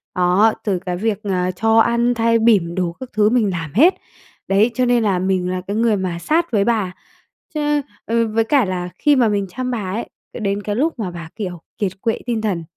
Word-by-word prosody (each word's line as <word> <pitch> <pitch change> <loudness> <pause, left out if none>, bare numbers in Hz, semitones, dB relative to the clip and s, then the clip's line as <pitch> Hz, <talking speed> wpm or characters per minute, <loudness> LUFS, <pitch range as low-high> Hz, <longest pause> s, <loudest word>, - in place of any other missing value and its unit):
đó, 180 +5 +4
từ 195 -4 0
cái 180 -1 -4
việc, 215 +1 -2
ờ, 185 -2 0
cho 225 +3 +2
ăn, 235 +1 +3
thay 230 0 +2
bỉm 195 -7 +3
đồ 180 -2 -1
các 260 -1 -8
thứ 210 0 +3
mình 230 -4 +2
làm 165 -4 -5
hết. 325 - +6 0.5
Đấy, 205 +5 +3
cho 255 +2 +1
nên 240 -2 +2
là 190 -4 +1
mình 185 -1 0
là 185 0 -2
cái 200 - -2
người 225 -1 +2
mà 180 -2 -3
sát 325 - 0
với 205 -3 +2
bà, 210 -6 0 0.6
cho 305 - -2
nên 295 0 +1 0.2
ừ, 230 0 +1
với 225 +1 +1
cả 265 -1 +2
là 180 -1 -3
khi 295 -1 +4
mà 245 -3 +4
mình 200 -2 0
chăm 255 +6 -4
bà 200 -6 -3
ấy, 230 - -4 0.2
ờ, - - -7
đến 200 -1 -2
cái 205 -1 -2
lúc 295 0 0
mà 185 -5 -3
bà, 165 -2 -8
kiểu, 180 -6 -5 0.2
kiệt 195 -3 -1
quệ 225 -1 0
tinh 230 -3 -1
thần, 185 -6 -1
215 Hz, 235 wpm, -19 LUFS, 185-235 Hz, 0.6 s, hết